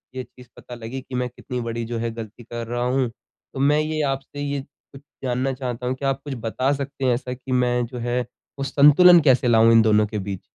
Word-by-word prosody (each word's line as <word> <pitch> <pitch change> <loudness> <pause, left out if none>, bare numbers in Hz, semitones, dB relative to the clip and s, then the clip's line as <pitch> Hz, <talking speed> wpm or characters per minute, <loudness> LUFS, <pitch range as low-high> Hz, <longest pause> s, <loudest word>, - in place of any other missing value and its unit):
ये 130 - -3
चीज़ 125 0 -17
पता 125 - -10
लगी 120 +3 -6
कि 125 0 -9
मैं 125 0 -1
कितनी 125 +1 -6
बड़ी 115 0 -4
जो 115 +1 -4
है 115 0 -2
ग़लती 115 +1 -9
कर 120 0 -6
रहा 120 +1 -2
हूँ। 125 0 +1
तो 125 +3 -15
मैं 145 +2 +3
ये 155 0 -1
आपसे 135 +1 -6
ये 140 -1 -2
कुछ 135 0 -18 0.2
जानना 130 +1 -1
चाहता 125 -1 -4
हूँ। 130 - -1
क्या 135 +1 -1
आप 135 0 -2
कुछ 145 - -5
बता 125 +4 -1
सकते 140 -1 -4
हैं? 125 - +3
ऐसा 125 +1 -3
कि 130 +1 -9
मैं 125 -1 +2
जो 125 +2 -9
है 120 +1 -1 0.4
वो - - -1
संतुलन 150 +6 +7
कैसे 130 -3 +3
लाऊँ 115 -1 +5
इन 115 -1 +7
दोनों 105 -1 +4
के 105 0 -4
बीच? 95 -1 -5
125 Hz, 240 wpm, -23 LUFS, 115-135 Hz, 0.4 s, संतुलन